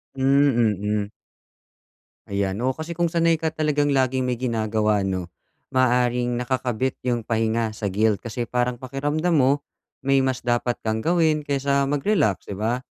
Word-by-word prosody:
Hmm, 135 -5 +3
mm. 105 0 -1 1.2
Ayan, 100 -1 -1
oo, 130 - +2
kasi 160 +4 -6
kung 170 0 0
sanay 165 -1 +3
ka 160 0 -2
talagang 150 -2 +1
laging 130 -1 +1
may 125 -2 -2
ginagawa, 110 -4 0
'no, 95 -2 -2 0.5
maaaring 125 -1 +2
nakakabit 125 0 -1
''yong 120 -1 0
pahinga 110 -1 0
sa 100 -3 -3
guilt 105 +1 +1
kasi 120 +1 -4
parang 125 0 -1
pakiramdam 145 +6 -1
mo, 140 0 +3 0.4
may 135 0 +2
mas 130 -1 0
dapat 120 0 -1
kang 110 0 -2
gawin 160 -3 +2
kaysa 140 0 +1
mag-relax, 145 - 0
'di 100 - -5
ba? 115 +5 -1
125 Hz, 150 wpm, -23 LUFS, 110-140 Hz, 1.2 s, Hmm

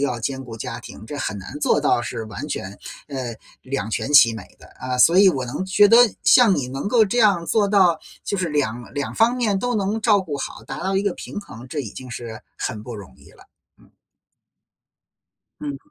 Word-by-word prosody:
要 125 -4 -1
兼 130 +3 -3
顾 115 -2 -9
家 - - -6
庭， 110 - -11
这 145 - -6
很 105 -7 -3
难 140 +10 -9
做 - - +2
到 140 -4 +2
是 115 -2 -5
完 115 +8 -7
全， 95 -7 -5 0.3
呃， 130 -4 -5 0.3
两 130 -5 -3
全 135 +6 -3
其 115 -6 +7
美 110 - -7 0.2
的 - - -16
啊。 130 -1 -3
所 170 +7 +6
以 195 +1 +7
我 135 -8 0
能 135 +9 -4
觉 195 +2 +5
得 230 - +6 0.3
像 235 -6 +6
你 130 - -2
能 135 +8 -4
够 225 0 +4
这 210 +4 -2
样 200 -7 +3
做 210 -3 +2
到， 185 -5 +4 0.3
就 200 - -2
是 180 -3 -1
两 125 -6 -2
两 145 +1 -4
方 235 +3 +3
面 215 -5 +1
都 245 -1 -1
能 205 +2 -1
照 210 -3 +4
顾 155 -6 -5
好， - - -6
达 - - -7
到 190 0 0
一 195 - +1
个 200 -3 0
平 - - -7
衡， 120 - -12
这 150 - -5
已 115 -7 -6
经 130 +2 -10
是 115 -1 -7 0.2
很 105 -1 -4
不 120 - -7
容 100 -11 -11
易 - - -18
了。 - - -19 0.4
嗯。 - - -23 1.7
嗯。 140 -2 -7
145 Hz, 235 characters per minute, -22 LUFS, 120-195 Hz, 1.7 s, 其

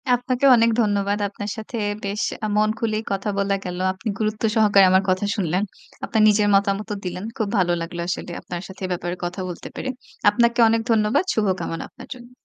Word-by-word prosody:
আপনাকেও 255 +2 +1
অনেক 230 0 +4
ধন্যবাদ। 205 -1 +1
আপনার 205 +1 -6
সাথে 220 +2 -6 0.3
বেশ 200 +2 -2 0.2
আ - - 0
মন 215 0 +3
খুলেই 220 -2 -1
কথা 195 +1 -1
বলা 200 0 +1
গেল। 180 -1 -4 0.2
আপনি 190 +4 -8
গুরুত্ব 215 +1 -2
সহকারে 205 -3 +6
আমার 190 +1 +4
কথা 185 +2 +1
শুনলেন। 180 0 0 0.4
আপনার 220 - +1
নিজের 210 0 +3
মতামতও 200 +1 0
দিলেন। 180 +2 -4
খুব 220 -3 0
ভালো 175 -2 +2
লাগলো 170 +1 -5
আসলে 180 - -3
আপনার 175 -1 -6
সাথে 190 0 -13
এ - - -4
ব্যাপারে 175 0 -3
কথা 180 +2 -4
বলতে 175 - -7
পেরে। 260 - -4 0.4
আপনাকে 235 +1 +2
অনেক 225 0 +2
ধন্যবাদ। 215 - +3
শুভকামনা 190 -5 -1
আপনার 255 - -13
জন্য। 245 0 -14
205 Hz, 190 wpm, -22 LUFS, 185-220 Hz, 0.4 s, সহকারে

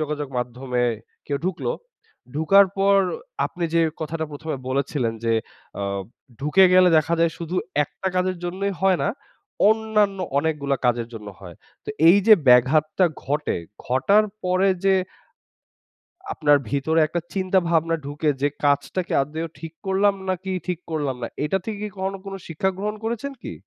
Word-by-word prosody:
যোগাযোগ 150 -2 -3
মাধ্যমে 125 0 -2 0.4
কেউ 140 -1 -1
ঢুকলো, 190 - -1 0.6
ঢুকার 195 +6 +5
পর 200 0 +4 0.5
আপনি 175 -2 -5
যে 165 - +4 0.2
কথাটা 160 +1 -3
১ম 150 +2 -9
এ - - -10
বলেছিলেন 135 -3 -1
যে, 115 - +2 0.5
"আ - - -2 0.6
ঢুকে 150 +7 +5
গেলে 185 0 +7
দেখা 160 +2 +1
যায় 165 -1 +4
শুধু 170 +2 -4 0.3
একটা 190 - -5
কাজের 185 0 +1
জন্যই 195 +3 -2
হয় 190 -2 +3
না, - - +1 0.6
অন্যান্য 215 -3 +1 0.2
অনেকগুলো 145 -3 0
কাজের 120 -1 +1
জন্য 105 -2 -8
হয়।" 90 -4 -11 0.3
তো - - -11 0.2
এই 185 - +8
যে 220 - +10
ব্যাঘাতটা 155 +8 +4 0.2
ঘটে, 150 +2 -1 0.3
ঘটার 200 +13 +3 0.2
পরে 185 +2 +2 0.2
যে 195 0 +5 1.4
আপনার 145 -2 +4
ভিতরে 160 +4 +1
একটা 175 - -2
চিন্তা-ভাবনা 170 -4 +1
ঢুকে 150 +2 -1
যে, 145 - +3 0.2
"কাজটা 145 +6 +1
কি - - -3
আদৌ 160 +3 -5
ঠিক 165 0 -8
করলাম 195 +1 +2
নাকি 190 +1 -2 0.2
ঠিক 180 -2 -2
করলাম 145 -4 -1
না?" - - -1 0.2
এইটা 170 +6 +1
থেকে 215 -2 -4
কি 210 - -3
কখনো 190 +1 -3
কোনো 195 0 -6
শিক্ষা 170 +4 -1
গ্রহণ 210 +2 -3
করেছেন 235 +5 -3
কি? - - -5
165 Hz, 155 wpm, -23 LUFS, 145-190 Hz, 1.4 s, যে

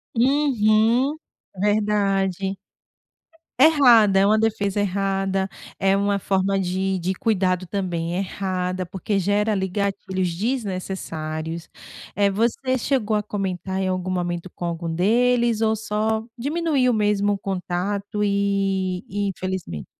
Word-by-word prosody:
Uhum, 245 0 +3 0.4
verdade. 195 -2 +1 1.0
Errada, 245 -10 +6
é 195 - +4
uma 215 +2 +4
defesa 205 -2 0
errada, 195 -1 0 0.3
é 195 0 +2
uma 200 0 +1
forma 195 0 0
de 190 +1 -1
de 180 +1 -1
cuidado 185 -3 0
também 175 -3 -2
errada, 185 -1 -2
porque 195 +2 -2
gera 205 +3 +1
ali, 190 -2 0
gatilhos 190 -2 -2
desnecessários, 175 -7 -4 0.5
eh, 200 -1 +3
você 235 +5 0
chegou 230 -5 0
a 210 - +1
comentar, 190 -2 -3
em 190 - 0
algum 185 0 -2
momento, 175 -1 -2
com 175 - -5
algum 170 -1 -3
deles 235 +5 +2
ou 220 0 +2
só 220 +1 -1
diminuiu 285 -1 +1
mesmo 205 -2 +2
o 200 - -2
contato 195 +2 -3
e 195 -2 0
e 205 +1 -2
infelizmente 185 - -5
195 Hz, 120 wpm, -23 LUFS, 185-215 Hz, 1.0 s, Errada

